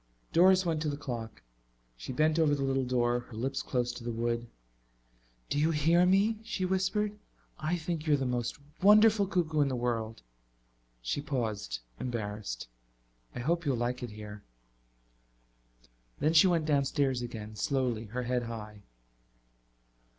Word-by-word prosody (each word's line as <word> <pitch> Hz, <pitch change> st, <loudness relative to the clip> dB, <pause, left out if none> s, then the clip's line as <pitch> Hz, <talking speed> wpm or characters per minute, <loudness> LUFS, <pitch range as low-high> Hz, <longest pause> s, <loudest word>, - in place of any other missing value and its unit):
Doris 185 Hz, +2 st, +6 dB
went 160 Hz, -3 st, 0 dB
to 155 Hz, -, 0 dB
the 145 Hz, -, -3 dB
clock. 120 Hz, -, -6 dB, 0.5 s
She -, -, -7 dB
bent 155 Hz, +4 st, +2 dB
over 150 Hz, -2 st, +4 dB
the 140 Hz, -, -2 dB
little 135 Hz, -1 st, +1 dB
door, 120 Hz, -1 st, +1 dB
her 120 Hz, -1 st, -12 dB
lips 135 Hz, +4 st, -2 dB
close 125 Hz, -2 st, -1 dB
to 125 Hz, -, -9 dB
the 120 Hz, -, -3 dB
wood. 115 Hz, +1 st, -1 dB, 1.0 s
"Do 145 Hz, -, -1 dB
you 155 Hz, +2 st, +3 dB
hear 165 Hz, +3 st, +4 dB
me?" 205 Hz, +4 st, +3 dB
she 210 Hz, -5 st, -2 dB
whispered. 190 Hz, +3 st, 0 dB, 0.4 s
"I 160 Hz, +3 st, 0 dB
think 165 Hz, -1 st, -4 dB
you're 150 Hz, -2 st, +4 dB
the 135 Hz, -, -2 dB
most 120 Hz, -2 st, -2 dB, 0.2 s
wonderful 210 Hz, +1 st, +6 dB
cuckoo 160 Hz, -5 st, +1 dB
in 145 Hz, -, +3 dB
the 130 Hz, -, -1 dB
world." 115 Hz, -, -2 dB, 0.8 s
She -, -, -1 dB
paused, 110 Hz, -, -3 dB, 0.2 s
embarrassed. 105 Hz, -, -4 dB, 0.7 s
"I 125 Hz, -, -4 dB
hope 170 Hz, +6 st, 0 dB
you'll 140 Hz, -5 st, 0 dB
like 120 Hz, +1 st, -2 dB
it 120 Hz, -, -4 dB
here." 105 Hz, -1 st, -9 dB, 1.8 s
Then 155 Hz, +2 st, +1 dB
she 165 Hz, +3 st, +7 dB
went 170 Hz, -3 st, +2 dB
downstairs 140 Hz, -3 st, +1 dB
again, 110 Hz, -3 st, -6 dB
slowly, 120 Hz, 0 st, -1 dB
her 120 Hz, +4 st, -4 dB
head 125 Hz, 0 st, 0 dB
high. 110 Hz, -3 st, -7 dB
135 Hz, 150 wpm, -30 LUFS, 120-165 Hz, 1.8 s, she